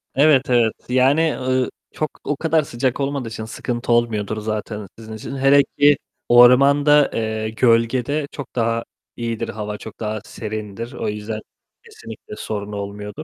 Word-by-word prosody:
Evet, 140 -1 +4
evet. 120 -3 +3 0.2
Yani, 140 +5 +3
ııı, 130 0 0 0.2
çok, 155 - -4
o 145 - -1
kadar 160 0 +2
sıcak 130 -1 -2
olmadığı 140 -3 -2
için 110 -1 -6
sıkıntı 120 +2 -4
olmuyordur 110 -3 +1
zaten 105 -1 -4
sizin 110 -1 -9
için. 110 +5 -7
Hele 135 +1 +5
ki 145 0 +6 0.3
ormanda, 140 +4 +6
eee, 110 -1 -2
gölgede 120 +5 +1
çok 140 - -9
daha 115 -1 0 0.3
iyidir, 115 -2 -3
hava 105 -1 -5
çok 110 0 -11
daha 110 -1 -3
serindir. 110 +2 -6
O 120 - -4
yüzden 105 +1 -4 0.4
kesinlikle 110 -1 -11
sorun 105 -1 -5
olmuyordur. 105 +6 -6
115 Hz, 145 wpm, -21 LUFS, 110-135 Hz, 0.4 s, ki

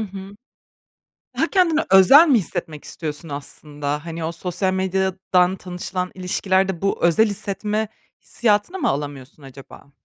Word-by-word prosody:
hı. 195 -1 -8 1.0
Daha - - +2
kendini 340 -5 +3
özel 230 - +8
mi 260 - +5
hissetmek 165 -5 -5
istiyorsun 155 0 -6
aslında? 145 +1 -6
Hani, 165 0 -5
o 160 - -2
sosyal 180 +2 -2
medyadan 190 -1 +1
tanışılan 180 0 -5
ilişkilerde 190 0 0
bu 195 - 0
özel 170 +6 +4
hissetme 210 +2 -3 0.3
hissiyatını 220 - 0
mı 300 - 0
alamıyorsun 140 0 -5
acaba? 135 +1 -14
185 Hz, 125 wpm, -21 LUFS, 160-200 Hz, 1.0 s, özel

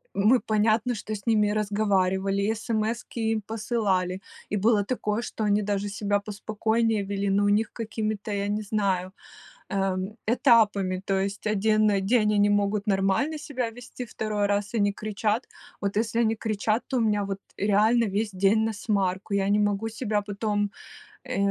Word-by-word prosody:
Мы 220 +5 +4
понятно, 220 +3 +1
что 215 +1 -5
с 200 - -10
ними 210 -2 +3
разговаривали, 200 -2 +1
и 215 +2 +1
СМСки 225 +1 -2
им 220 - 0
посылали, 205 -5 -1 0.3
и 205 - -1
было 210 0 +3
такое, 220 -1 -2
что 220 - -4
они 210 0 +2
даже 205 0 -1
себя 205 0 0
поспокойнее 215 +1 -1
вели. 200 0 -2
Но 200 +1 +2
у - - +3
них 210 +2 +1
какими-то, 215 -2 -3
я 200 0 -1
не 210 +1 -1
знаю, 195 -3 -1 0.6
эм, 195 +1 -2
этапами. 215 -6 +3
То 195 -1 +1
есть 200 +1 -3
1 215 +1 +3 0.2
день 210 -1 +3
они 205 0 +4
могут 205 +1 +1
нормально 195 +10 +1
себя 255 -5 -3
вести, 245 +2 -9
2 210 -2 -2
раз 205 +1 -1
они 205 -3 +2
кричат. 215 +2 -2 0.3
Вот 200 0 -2
если 230 +1 0
они 225 -1 +2
кричат, 215 +1 -1
то 260 - -1
у - - +2
меня 210 -2 +1
вот 195 0 -4 0.2
реально 215 +4 +3
весь 210 +1 -1
день 195 +3 +3
насмарку. 200 -2 -1
Я 195 -1 +1
не 205 +1 +3
могу 205 +1 0
себя 215 -2 -1
потом, 205 0 -1 0.5
э, - - -4
210 Hz, 165 wpm, -26 LUFS, 200-220 Hz, 0.6 s, Мы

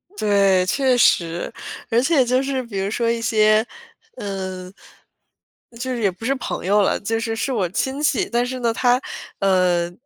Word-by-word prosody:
对， 200 - +3
确 260 +5 +1
实。 170 -7 +2 0.4
而 230 -1 +3
且 275 -1 +3
就 255 +2 +2
是， 270 -1 -2
比 215 -5 -5
如 195 +1 -1
说 230 +2 -1
一 230 0 -2
些， 215 0 +3 0.5
嗯 190 -2 -6 1.1
就 260 +1 -3
是 240 - -4
也 200 - +3
不 185 +5 -11
是 270 - +2
朋 260 - -5
友 205 +2 +3
了， 195 - +1
就 225 +2 -2
是 225 0 -3
是 225 +5 -2
我 205 -8 0
亲 265 +9 -2
戚。 300 - +1
但 240 +1 +1
是 255 0 -5
呢， 230 -1 +1
他， 245 +1 +2 0.4
呃， 180 -3 +2
225 Hz, 190 characters per minute, -21 LUFS, 195-250 Hz, 1.1 s, 对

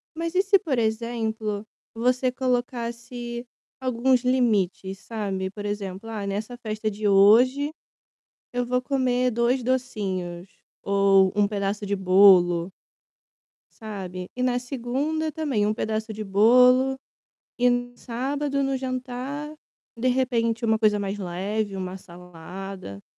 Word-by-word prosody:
Mas 335 +1 -3
e 375 - +5
se, 395 0 +4
por 310 -10 -2
exemplo, 220 -2 -2 0.3
você 250 +2 +1
colocasse 240 -1 -3 0.3
alguns 255 0 +2
limites, 205 -7 +1
sabe. 195 -4 -3
Por 205 +1 -7
exemplo: 205 0 -5
"Ah, 215 -3 -4
nessa 210 +5 -4
festa 215 -2 -3
de 210 0 -2
hoje, 240 +9 +5 0.8
eu 245 0 0
vou 250 +1 0
comer 255 -2 +1
2 240 +2 +1
docinhos, 195 -8 -2 0.3
ou 195 -1 +4
1 205 - +4
pedaço 200 0 -2
de 200 - 0
bolo" 185 -2 +5 1.1
sabe, 185 -4 -7
e, 250 - -2
na 250 -1 +1
segunda, 275 +6 -2
também 280 -9 0
um 215 - +1
pedaço 220 +1 -3
de 215 0 -5
bolo 250 +6 +5 0.6
e, 245 0 +4
no 245 0 -1
sábado, 275 +4 -2
no 270 0 0
jantar 260 +3 -4 0.4
de 240 +3 0
repente 235 -3 0
uma 220 -1 +2
coisa 215 -2 +3
mais 200 0 -3
leve, 195 +3 -3
uma 185 0 -5
salada 180 - -9
225 Hz, 125 wpm, -25 LUFS, 200-255 Hz, 1.1 s, e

